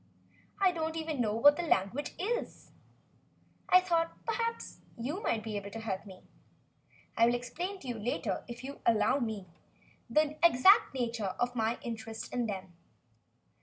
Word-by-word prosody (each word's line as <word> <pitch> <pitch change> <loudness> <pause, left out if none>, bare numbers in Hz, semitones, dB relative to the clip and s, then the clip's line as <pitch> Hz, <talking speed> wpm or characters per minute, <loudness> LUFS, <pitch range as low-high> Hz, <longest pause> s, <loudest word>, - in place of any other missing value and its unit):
I 385 -2 +5
don't 320 -1 -3
even 315 -4 -2
know 215 -2 0
what 290 +6 +6
the - - 0
language 280 - 0
is. 465 +7 -3 1.0
I 365 - +8
thought, 335 -2 -1
perhaps, 460 0 -2 0.2
that 230 - -6
you 305 - -3
might 220 - 0
be 220 -1 -4
able 200 0 -6
to 225 - -7
help 205 -2 -4
me. 185 -1 -12 0.9
I 230 - +5
will 240 - +3
explain 345 +11 -4
to 270 - -10
you 240 -3 -3
later, 230 +4 -2
if 240 +1 -8
you 270 - -5
will - - -19
allow 235 +4 +3
me, 220 -6 -3 0.6
the 305 0 +2
exact 340 - +6
nature 230 -6 -2
of 245 0 0
my 225 +1 0
interest 225 -1 -6
in 245 -2 0
them." 190 -3 -6
245 Hz, 165 wpm, -31 LUFS, 225-320 Hz, 1.0 s, I